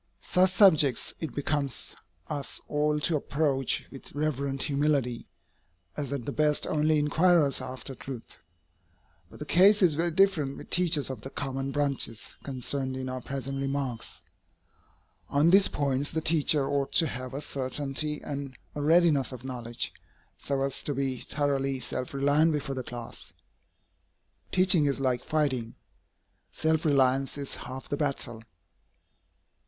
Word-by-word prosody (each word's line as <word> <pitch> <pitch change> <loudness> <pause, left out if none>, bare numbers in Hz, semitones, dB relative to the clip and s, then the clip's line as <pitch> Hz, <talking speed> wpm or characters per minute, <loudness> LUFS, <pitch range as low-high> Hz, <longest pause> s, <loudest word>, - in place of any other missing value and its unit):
Such 185 +1 +2
subjects 160 - +5
it 160 - -5
becomes 145 -2 -2 0.3
us 145 -2 -2
all 150 0 +1
to 160 +2 +3
approach 140 -2 0
with 135 - -11
reverent 140 -2 -1
humility, 140 -5 0 0.7
as 140 -2 -3
at 140 -5 -3
the - - -3
best 150 0 +2
only 155 0 +2
inquirers 150 0 +3
after 130 +1 -7
truth. 130 -2 -9 0.9
But - - -14
the 150 - -7
case 195 +5 +5
is 170 -4 +5
very 165 +3 0
different 165 -6 +2
with - - -12
teachers 165 -6 +3
of 125 -5 -7
the 135 - -7
common 135 -1 -4
branches 140 -6 -1
concerned 130 0 -2
in 130 0 -4
our 130 0 -4
present 135 +1 -4
remarks. 135 -3 -3 1.1
On 150 +4 +3
these 195 +1 +7
points 140 0 0
the 160 - -1
teacher 155 -3 +3
ought 140 -1 -1
to 165 - +5
have 130 -3 -5
a - - -2
certainty 145 +2 -3
and 140 -3 -6 0.2
a 145 - -4
readiness 155 -3 +3
of 125 -1 -9
knowledge, 120 -2 -4 0.4
so 140 -1 -2
as 135 -1 0
to 145 - -2
be 135 -2 -2
thoroughly 135 -2 -1
self 130 0 -4
reliant 145 +4 +3
before 145 -2 -2
the 130 - -3
class. 120 -1 -9 1.2
Teaching 185 -5 +4
is 140 -1 0
like 130 -2 0
fighting. 140 -7 -1 0.8
Self 160 0 0
reliance 135 -2 +2
is 140 -1 -4
half 130 +1 -7
the 145 - -2
battle. 135 -6 -2
140 Hz, 145 wpm, -28 LUFS, 135-150 Hz, 1.2 s, these